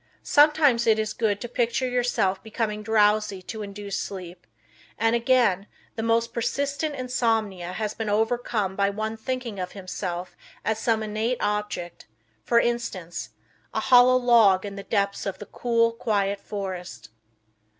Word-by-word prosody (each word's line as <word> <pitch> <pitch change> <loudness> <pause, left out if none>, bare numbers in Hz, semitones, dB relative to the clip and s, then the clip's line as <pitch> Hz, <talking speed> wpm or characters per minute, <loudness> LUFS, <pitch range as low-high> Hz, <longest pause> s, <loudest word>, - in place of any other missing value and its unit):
Sometimes 290 -5 +4
it 220 -1 +5
is 215 0 -1
good 210 -3 0
to 240 - -4
picture 240 +1 0
yourself 245 -6 0
becoming 215 -1 -3
drowsy 210 -2 +2
to 220 +3 -6
induce 200 0 -5
sleep, 180 -2 -8 0.5
and, 225 +1 +2
again, 235 -5 +2 0.3
the 225 - -3
most 230 +1 +1
persistent 280 +5 -1
insomnia 225 -8 -1
has 215 +1 -3
been 220 -1 -4
overcome 220 -2 0
by 200 0 +2
one 215 +2 -3
thinking 235 -2 -4
of 180 0 -4
himself 185 -2 -5 0.3
as 220 0 0
some 220 -1 +1
inanimate 215 +3 -1
object 205 -4 -3 0.4
for 235 - +4
instance, 220 - -2 0.5
a - - +2
hollow 245 +2 +6
log 225 -6 +5
in 200 -1 -6
the 200 - -6
depths 200 -1 -1
of 195 - -3
the 205 - -9
cool, 230 0 +1
quiet 205 -3 -1
forest. 180 - -6
215 Hz, 145 wpm, -25 LUFS, 200-235 Hz, 0.5 s, hollow